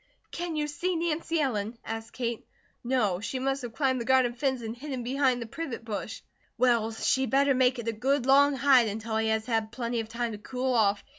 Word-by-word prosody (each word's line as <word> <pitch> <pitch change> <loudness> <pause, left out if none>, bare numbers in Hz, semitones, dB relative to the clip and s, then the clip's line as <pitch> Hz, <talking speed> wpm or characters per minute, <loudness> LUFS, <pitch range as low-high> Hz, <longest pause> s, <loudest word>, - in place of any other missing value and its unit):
"Can 345 -2 -4
you 300 -1 0
see 345 +5 -2
Nancy 330 0 -1
Ellen?" 230 -5 -1
asked 225 0 -6
Kate. 235 -2 -3 0.4
"No. 230 -8 +1
She 225 +5 -4
must 270 +1 -1
have 235 -2 -7
climbed 260 -4 +1
the - - -4
garden 260 -1 +3
fence 260 -1 -1
and 225 +1 -5
hidden 260 -1 -5
behind 260 0 +1
the 235 - -4
privet 240 -2 -6
bush." 220 0 -5 0.4
"Well, 235 -2 +3
she 260 +4 +1
better 275 +1 +3
make 255 0 +3
it 235 -1 -6
a - - +2
good 265 +4 0
long 280 +1 +5
hide, 265 -3 +5
until 220 +1 -3
he 220 0 +1
has 220 0 0
had 225 -2 -1
plenty 235 0 -2
of 220 -1 -4
time 235 0 -2
to 210 - -7
cool 255 +3 -2
off. 205 -3 +2
245 Hz, 215 wpm, -28 LUFS, 225-270 Hz, 0.4 s, long